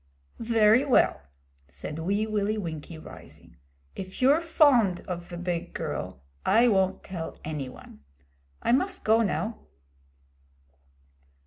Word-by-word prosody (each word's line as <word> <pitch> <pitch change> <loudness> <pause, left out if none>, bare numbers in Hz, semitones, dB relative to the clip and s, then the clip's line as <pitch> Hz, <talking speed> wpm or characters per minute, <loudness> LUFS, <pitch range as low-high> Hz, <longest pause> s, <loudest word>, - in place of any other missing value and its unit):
'Very 225 +1 +4
well,' 255 - +3 0.5
said 150 - -7
Wee 200 +6 0
Willie 215 0 -1
Winkie, 165 -4 -6
rising. 155 - -14 0.4
'If 185 0 -8
you're 280 +5 +4
fond 270 - +4
of 175 -1 -6
ve 175 - -8
big 175 -1 -4
girl, 65 - -5 0.2
I 235 +3 +4
won't 190 -3 +1
tell 175 -4 -6
any 150 -4 -4
one. 70 - -14 0.6
I - - +2
must 370 +9 +1
go 225 +1 +4
now.' 220 +1 -2
200 Hz, 120 wpm, -27 LUFS, 170-230 Hz, 0.6 s, Very